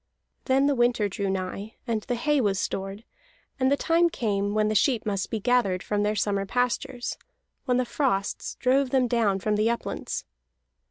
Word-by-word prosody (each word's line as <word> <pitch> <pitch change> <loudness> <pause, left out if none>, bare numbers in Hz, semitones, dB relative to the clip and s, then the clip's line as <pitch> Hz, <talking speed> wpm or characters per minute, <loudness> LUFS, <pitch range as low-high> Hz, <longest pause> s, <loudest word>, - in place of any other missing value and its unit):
Then 265 +1 +3
the 285 - +3
winter 240 -4 +2
drew 200 0 -3
nigh; 195 +3 -4
and 230 -3 -1
the 245 +3 -2
hay 290 +4 +2
was 200 -4 +1
stored, 195 +3 -3 0.6
and 260 +1 +3
the 285 - +3
time 335 +3 +3
came 205 -7 -1
when 215 0 +3
the 215 - 0
sheep 230 +2 +2
must 200 -2 -1
be 225 - -2
gathered 210 -5 +1
from 205 -1 -1
their 210 +1 +1
summer 200 -1 0
pastures, 245 +1 -1 0.5
when 250 -2 +2
the 255 - +1
frosts 235 -7 -1
drove 260 +2 +2
them 255 -1 +2
down 225 -5 +2
from 210 +2 0
the 215 +2 +2
uplands. 235 - -3
225 Hz, 180 wpm, -26 LUFS, 200-250 Hz, 0.6 s, Then